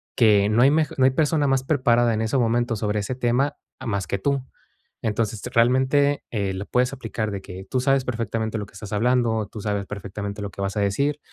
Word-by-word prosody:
que 105 -3 +4
no 115 +3 +4
hay 135 - +6
mej 155 -1 +2
no 130 - +4
hay 130 - +5
persona 150 +2 +1
más 135 -1 +2
preparada 120 -4 +3
en 110 - -1
ese 110 +4 0
momento 120 0 +1
sobre 105 0 -1
ese 105 +5 -3
tema, 125 +3 +1 0.2
a - - -8
más 100 -5 -2
que 100 - -1
tú. 135 +6 0 0.6
Entonces, 110 0 -1
realmente, 130 +4 +3
eh, 100 -4 -1
lo 95 +2 -5
puedes 125 +3 +1
aplicar 110 -4 -3
de 100 - -4
que 95 0 -9
tú 130 - 0
sabes 135 0 +2
perfectamente 110 -2 -2
lo 105 - -4
que 100 - -20
estás 105 - -9
hablando, 115 -1 +1
tú 110 - -7
sabes 100 -1 -2
perfectamente 100 +1 -6
lo 100 - -4
que 100 - -8
vas 100 +1 -2
a - - +2
decir. 140 +9 0
115 Hz, 225 wpm, -23 LUFS, 105-130 Hz, 0.6 s, hay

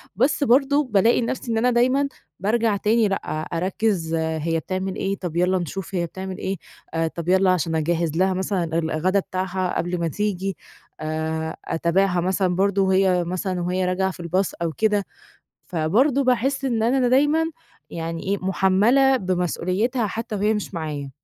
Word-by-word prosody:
بس 265 +7 +2
برضو 280 +3 +4
بالاقي 225 -2 +3
نَفْسي 235 0 -3
إن 225 - 0
أنا 250 +3 +3
دايمًا، 255 +4 +3 0.3
بارجع 220 +1 +1
تاني 220 +2 +2
لأ، 195 - 0 0.4
أركّز 180 -1 -1
هي 160 0 -1
بتعمل 185 +2 -3
إيه 195 +1 -1
طَب 175 -4 -5
يالّا 180 +2 +3
نشوف 190 +2 -5
هي 175 -1 0
بتعمل 190 +2 -6
إيه، 190 +1 -3 0.4
آآ، 165 0 +1
طَب 170 +1 -5
يالّا 190 0 +4
عشان 165 -2 0
أجهّز 165 0 0
لها 190 +1 +3
مثلًا 190 0 -1 0.2
الغدا 170 +4 +1
بتاعها 185 -1 -2
قبل 175 +1 -2
ما 170 - 0
تيجي، 195 0 -2 0.4
آآ، 160 +1 -2
أتابعها 175 +2 +1
مثلًا 185 0 +1
برضو 195 +1 +2
وهي 190 -2 +3
مثلًا 185 +1 -2
وهي 180 +1 0
راجعة 190 +1 0
في 175 - -9
الbus 185 +3 0
أو 165 - 0
كده، 210 0 +1 0.6
فبرضو 220 - +2
باحِس 265 +2 +1
إن 235 -4 0
أنا 255 +2 +2
د - - -2
دايمًا، 295 +5 +3 0.4
يعني 165 0 -4
إيه 200 +1 -1
مُحمّلة 205 +9 +3
بمسؤوليتها 185 +4 0
حتّى 225 +2 -4
وهي 210 +2 +2
مش 210 -2 -4
معايا. 150 -4 -4
190 Hz, 165 wpm, -23 LUFS, 175-220 Hz, 0.6 s, برضو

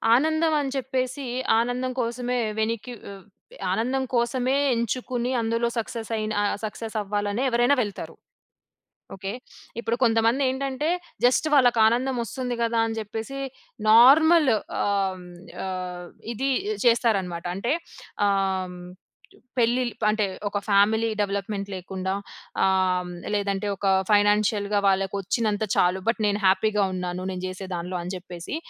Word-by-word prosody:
ఆనందం 315 +4 +2
అని 275 -2 -3
చెప్పేసి 260 0 -2 0.3
ఆనందం 245 +2 -1
కోసమే 245 +1 -2 0.2
వెనిక్కి 230 +2 -2
వె 200 - -8 0.6
ఆనందం 255 +4 0
కోసమే 245 +2 +1 0.2
ఎంచుకొని 245 +1 -2
అందులో 230 +1 0
సక్సెసయిన 220 -1 -3 0.3
సక్సెస్ 220 +1 -6
అవ్వాలనే 205 +3 -2
ఎవ్వరైనా 240 +3 +3
వెళ్తారు. 205 -2 -7 1.0
ఓకే. 195 0 -5 0.5
ఇప్పుడు 235 0 -1
కొంతమందేంటంటే 260 +5 +1 0.4
జస్ట్ 255 +5 +3
వాళ్ళకానందం 245 0 +4
ఒస్తుంది 245 +2 -4
గదా 230 0 +1
అని 225 0 -3
జెప్పేసి 220 +5 -5 0.5
నార్మల్ 285 +6 +7 0.3
ఆహ్, 195 -2 0 0.4
ఆహ్, 180 -1 -5 0.3
ఇది 265 +5 -1 0.4
చేస్తారన్నమాట. 200 -8 +2
అంటే 235 +8 0 0.5
ఆహ్, 190 -2 0 0.8
పెళ్లిల్ 240 +1 +2 0.2
అంటే 215 0 +2 0.2
ఒక 205 - -2
ఫ్యామిలీ 215 +3 +3
డెవలప్మెంట్ 200 0 -2
లేకుండా 190 0 -4 0.5
ఆహ్, 185 -1 +2 0.2
లేదంటే 200 0 -1
ఒక 195 +1 -2 0.2
ఫైనాన్షియల్‌‌గా 205 0 +3
వాళ్ళకి 195 0 +1
ఒచ్చినంత 210 +2 -1
చాలు 180 +1 +3
బట్ 230 +1 +1
నేను 205 0 +1
హ్యాపీగా 205 +2 +3
ఉన్నాను. 180 0 -3
నేను 185 -1 -4
జేసే 185 +1 -6
దానిలో 175 +2 -4
అని 175 +1 -5
జెప్పేసి 180 - -7
220 Hz, 115 wpm, -25 LUFS, 195-245 Hz, 1.0 s, నార్మల్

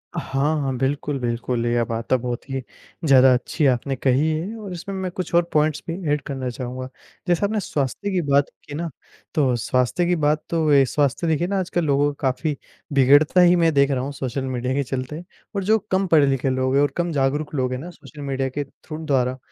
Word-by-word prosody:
अ, - - 0
हाँ, 140 +2 0
हाँ, 135 -2 -1
बिल्कुल, 140 +2 -1
बिल्कुल। 120 0 -2
ये 120 0 +2
बात 115 +2 -2
बहुत 125 +1 -2
ही 135 0 -2 0.4
ज़्यादा 130 -2 +7
अच्छी 130 +5 0
आपने 135 +3 -3
कही 130 +3 +2
है 165 +8 -2
और 205 -3 -7
इसमें 185 +3 -6
मैं 190 -1 -3
कुछ 180 0 -5
और 170 - +5
पॉइंट्स 155 0 +2
भी - - -1 0.2
ऐड 150 - -1
करना 135 -3 -3
चाहूँगा। 130 +1 -6 0.4
जैसा 175 +3 +2
आपने 215 +1 0
स्वास्थ्य 155 - -2
की 185 -2 +1
बात 140 0 +4 0.2
की 145 - -8
ना, 165 +2 -3 0.4
तो 135 -6 +2
स्वास्थ्य 125 +8 0
की 175 +1 +2
बात 150 +1 +2
तो 160 -2 +1
ये 140 -1 +6
स्वास्थ्य, 145 +4 0
देखिए 160 +2 +1
ना, 200 +1 0
आजकल 175 -2 -1
लोगों 145 0 +2
का 140 -1 0
काफ़ी 150 +3 -3 0.4
बिगड़ता 145 +6 +5
ही 175 0 +6
मैं 165 -2 +3
देख 140 0 +3
रहा 130 -2 0
हूँ 140 - -4
सोशल 135 -1 -3
मीडिया 130 0 -2
के 140 +1 0
चलते। 135 +5 -5 0.3
और 200 - -1
जो 215 +3 +4
कम 190 +1 +2
पढ़े 160 -4 +5
लिखे 135 0 +1
लोग 130 +1 0
हैं 140 - +5
और 145 - +2
कम 175 0 0
जागरूक 145 +1 -1
लोग 130 -2 0
हैं 125 - -3
ना, 165 +6 -7
सोशल 155 -3 -13
मीडिया 135 -1 -2
के 145 - +1
थ्रू 155 +3 -10
द्वारा, 130 -3 +1
140 Hz, 220 wpm, -22 LUFS, 130-165 Hz, 0.4 s, ज़्यादा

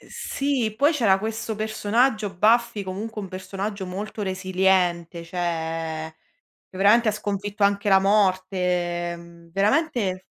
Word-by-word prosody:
sì. 270 -6 -2
Poi 290 +7 +4
c'era 225 -10 +3
questo 220 +1 -4
personaggio, 215 0 0
Buffy, 225 +1 +3
comunque 210 +4 -5
un 200 - -6
personaggio 195 +2 -5
molto 195 +3 -5
resiliente, 185 -3 0
cioè 165 -2 -3 0.5
che - - -13
veramente 215 +4 +5
ha - - +2
sconfitto 205 0 -4
anche 200 +1 +1
la 195 -1 +7
morte, 190 -1 +2 0.6
ehm, 170 0 -13
veramente 205 - +1
195 Hz, 120 wpm, -24 LUFS, 185-215 Hz, 0.6 s, la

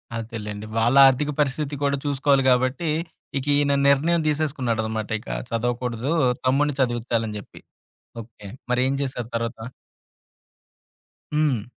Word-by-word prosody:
అదేలెండి. 110 -2 -6
వాళ్ళ 120 +3 +2
ఆర్థిక 140 +3 +1
పరిస్థితి 145 0 0
కూడా 140 0 +1
చూసుకోవాలి 140 -1 +2
గాబట్టి, 130 +5 +1 0.5
ఇక 135 - -3
ఈయన 145 0 +2
నిర్ణయం 160 +5 +3
తీసేసుకున్నాడనమాట. 120 -8 -1
ఇక 110 - -13 0.2
చదవకూడదు, 120 +2 -2 0.3
తమ్ముడిని 140 +2 +2
చదివచ్చాలని 120 -3 -1
జెప్పి. - - -14 0.6
ఓకె. 105 -2 -13 0.2
మరేం 125 +2 +2
జేశారు 125 -4 -4
తర్వాత? 115 0 -4 1.7
హ్మ్. 145 -8 +1
125 Hz, 105 wpm, -23 LUFS, 115-140 Hz, 1.7 s, నిర్ణయం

